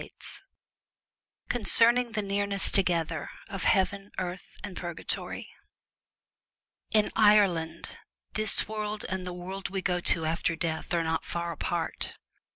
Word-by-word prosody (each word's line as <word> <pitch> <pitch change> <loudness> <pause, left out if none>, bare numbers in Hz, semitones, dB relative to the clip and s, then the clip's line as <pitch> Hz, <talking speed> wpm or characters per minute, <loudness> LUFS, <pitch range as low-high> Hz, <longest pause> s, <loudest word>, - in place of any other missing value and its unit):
164 245 - -1
CONCERNING 235 +2 +4
THE 215 -1 -1
NEARNESS 200 0 +1
Concerning 195 - +4
TOGETHER 165 -3 -1 0.2
OF 195 -2 -4
HEAVEN, 195 0 +2
EARTH, 185 0 -3 0.2
AND 200 -3 -6
PURGATORY 175 -2 -4 1.4
In 215 -1 +3
Ireland 190 -7 +3 0.3
this 215 0 +2
world 215 0 -3
and 185 -1 -3
the 180 - -4
world 190 +2 -5
we 190 -1 -3
go 180 -1 +1
to 165 -2 +3
after 165 +1 0
death 160 -1 -3
are 170 - +2
not 160 0 -1
far 170 0 -3
apart. 165 0 -3
190 Hz, 130 wpm, -29 LUFS, 170-205 Hz, 1.4 s, CONCERNING